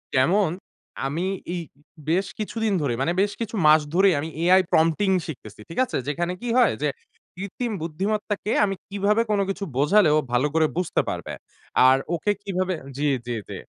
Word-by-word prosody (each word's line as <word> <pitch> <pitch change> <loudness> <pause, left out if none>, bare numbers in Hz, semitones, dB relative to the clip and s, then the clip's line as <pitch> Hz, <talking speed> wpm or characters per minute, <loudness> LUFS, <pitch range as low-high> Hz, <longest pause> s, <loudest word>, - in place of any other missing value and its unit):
যেমন 175 +9 +3 0.6
আমি 160 +6 -2 0.3
এই 175 - -2 0.5
বেশ 185 +4 +2
কিছুদিন 220 0 -1
ধরেই, 125 -5 -1
মানে 165 +5 +1
বেশ 205 +1 +1
কিছু 230 0 -3
মাস 155 +1 +7
ধরেই 190 +1 +5
আমি 155 +3 -4
AI 185 +2 +6
prompting 165 +5 +3
শিখতেছি। 110 -10 -9
ঠিক 165 - -5
আছে? - - -3
যেখানে 170 +5 -1
কী 245 - -4
হয় 245 -5 +5
যে 150 - +2 0.5
কৃত্রিম 200 +6 -4
বুদ্ধিমত্তাকে 205 +6 -2
আমি 195 -1 -2
কিভাবে 205 +2 +1
কোন 205 - +2
কিছু 195 +1 -3
বোঝালে 155 +6 +4
ও - - +4
ভালো 125 +4 +2
করে 160 -1 +3
বুঝতে 180 -2 +1
পারবে? - - -5 0.5
আর 130 +1 +6 0.2
ওকে 205 +5 0
কিভাবে 185 -1 -1 0.2
জি, 150 +1 0 0.2
জি, 120 - -2
জি। - - -5
180 Hz, 170 wpm, -24 LUFS, 155-205 Hz, 0.6 s, মাস